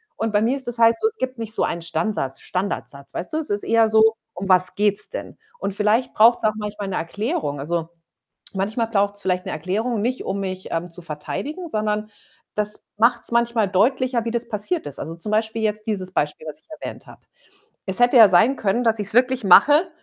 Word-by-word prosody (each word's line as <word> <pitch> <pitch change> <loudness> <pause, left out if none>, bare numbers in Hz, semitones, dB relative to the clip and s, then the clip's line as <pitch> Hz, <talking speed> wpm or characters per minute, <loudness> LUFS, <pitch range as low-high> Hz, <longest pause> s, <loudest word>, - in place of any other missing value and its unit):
Und 225 0 -2
bei 205 0 +2
mir 240 +4 +1
ist 265 - -10
das 240 -1 -4
halt 230 0 +4
so, 440 - +2
es 445 - -6
gibt 255 - -4
nicht 220 -1 -4
so - - 0
einen 170 - -2
Stansatz 165 -4 -3
Standardsatz, 140 -7 -4
weißt 180 - -5
du? - - 0
Es 315 - -3
ist 205 0 -1
eher 225 -1 +3
so: 220 +1 +4 0.2
„Um 195 +2 -5
was 185 -1 +3
geht‘s 205 0 +3
denn?“ - - -7 0.2
Und 200 - -3
vielleicht 210 +5 +1
braucht‘s 230 +2 +5
auch 215 - +2
manchmal 210 -1 -5
‘ne 190 - -3
Erklärung. 205 - -3
Also, 165 +3 -3 0.7
manchmal 210 +4 -1
braucht‘s 205 -2 0
vielleicht 180 -1 -1
‘ne - - -4
Erklärung, 205 +8 -2
nicht, 250 +3 -2
um 195 +1 -3
mich, 185 -1 -5
ähm, 170 +2 -3
zu 175 +1 -8
verteidigen, 195 - -5
sondern 215 -5 -2 0.4
das 210 0 0
macht‘s 235 +1 +3
manchmal 235 -3 +1
deutlicher, 240 +5 +1
wie - - -1
das 235 0 -2
passiert 225 - -2
ist. 140 - -7
Also, 165 - -6
zum 190 +6 -3
Beispiel 220 +1 -1
jetzt 215 0 -2
dieses 190 -4 -3
Beispiel, 150 -1 -2
was 155 - -7
ich - - -35
erwähnt - - -8
habe. - - -15 0.6
Es 190 -1 0
hätte 245 +1 +4
ja 225 -3 +9
sein 205 +9 +4
können, 220 +3 0
dass 225 -1 +7
ich‘s 205 0 +3
wirklich 255 0 +2
mache 295 - +6
210 Hz, 215 wpm, -22 LUFS, 185-235 Hz, 0.7 s, ja